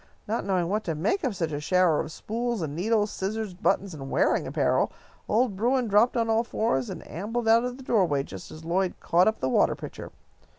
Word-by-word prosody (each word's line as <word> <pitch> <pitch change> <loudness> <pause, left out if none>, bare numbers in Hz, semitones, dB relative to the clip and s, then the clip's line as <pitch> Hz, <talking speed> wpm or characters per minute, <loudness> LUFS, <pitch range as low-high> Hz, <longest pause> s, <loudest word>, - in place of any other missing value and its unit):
Not 225 +3 -2
knowing 185 -3 +1
what 210 +4 -1
to 165 - -1
make 205 - 0
of 250 -7 -1
such 165 -3 -2
a 145 - -2
shower 180 0 +3
of 160 - -3
spools 235 +1 -3
and 150 -2 -4
needles, 210 +4 +1
scissors, 210 +1 -3
buttons, 195 0 0
and 135 -3 -7
wearing - - +2
apparel, - - +1 0.4
old 225 -1 +2
Bruin 245 +4 +1
dropped 215 +4 +3
on 230 -1 +1
all 225 +1 +2
fours 175 - -1
and - - -8
ambled 225 +8 -3
out 230 +1 +5
of 250 0 -4
the 265 - -11
doorway 180 - +2
just 95 -8 -9
as 155 +1 -11
Lloyd 180 +2 0
caught 175 +2 +3
up 220 - +1
the 130 - +1
water 130 - +3
pitcher. - - -8
200 Hz, 215 wpm, -26 LUFS, 165-225 Hz, 0.4 s, out